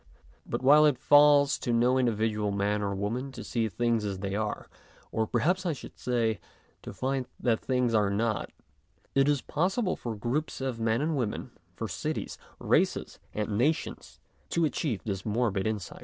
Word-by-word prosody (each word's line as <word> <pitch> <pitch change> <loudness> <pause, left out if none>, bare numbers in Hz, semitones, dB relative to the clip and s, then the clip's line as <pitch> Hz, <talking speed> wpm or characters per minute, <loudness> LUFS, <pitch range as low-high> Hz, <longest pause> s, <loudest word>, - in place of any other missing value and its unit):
But, - - -3
while 150 +3 +7
it 145 -4 +2
falls 145 +1 +5
to 120 - -2
no 120 +2 +3
individual 110 -3 0
man 100 +1 0
or 100 -1 -1
woman 115 +7 -3
to - - -7
see 115 -2 -1
things 115 +2 0
as 100 -2 -3
they 95 0 -4
are, 105 +1 -2 0.4
or 110 0 0
perhaps 175 - +1
I 175 -3 0
should 140 - -11
say, 115 -3 0 0.4
to - - -8
find 130 -1 -2
that 115 -3 +1
things 125 -2 0
are 105 -2 +3
not, 110 +1 -1 0.6
it 135 +1 +4
is 145 -3 +1
possible 185 +6 0
for 115 -2 -5
groups 120 +9 -2
of 130 -3 -3
men 115 +2 +1
and 160 0 0
women, 120 -6 -3 0.2
for - - -4
cities, - - -4 0.2
races, - - 0 0.2
and 105 -1 -2
nations, 150 +6 -1 0.3
to 170 -1 +2
achieve 145 - -2
this 95 -3 -3
morbid 110 -3 0
insight. 105 -4 -4
120 Hz, 170 wpm, -29 LUFS, 105-135 Hz, 0.6 s, while